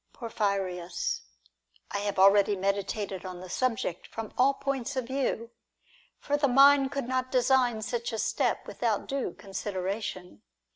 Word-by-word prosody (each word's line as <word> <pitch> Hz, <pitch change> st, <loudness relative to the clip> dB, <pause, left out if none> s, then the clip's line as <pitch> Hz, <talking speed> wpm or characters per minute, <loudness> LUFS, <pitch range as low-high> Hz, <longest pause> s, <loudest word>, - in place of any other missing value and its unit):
Porphyrius. 195 Hz, -6 st, -2 dB, 0.7 s
I 200 Hz, -, -1 dB
have 205 Hz, -1 st, -2 dB
already 200 Hz, +1 st, +6 dB
meditated 195 Hz, 0 st, -2 dB
on 185 Hz, -1 st, -7 dB
the 180 Hz, 0 st, -9 dB
subject 225 Hz, -8 st, -1 dB
from 225 Hz, -2 st, -7 dB
all 270 Hz, +2 st, +4 dB
points 275 Hz, -1 st, -3 dB
of 260 Hz, -2 st, -1 dB
view; 250 Hz, -3 st, -2 dB, 0.7 s
for 290 Hz, 0 st, -1 dB
the 290 Hz, -1 st, +3 dB
mind 275 Hz, +1 st, +6 dB
could 275 Hz, -4 st, -3 dB
not 255 Hz, 0 st, -1 dB
design 250 Hz, -3 st, +3 dB
such 240 Hz, +2 st, -2 dB
a 225 Hz, -, -3 dB
step -, -, 0 dB
without -, -, -1 dB
due 275 Hz, -2 st, -2 dB
consideration. 190 Hz, -, -4 dB
225 Hz, 140 wpm, -29 LUFS, 195-260 Hz, 0.7 s, already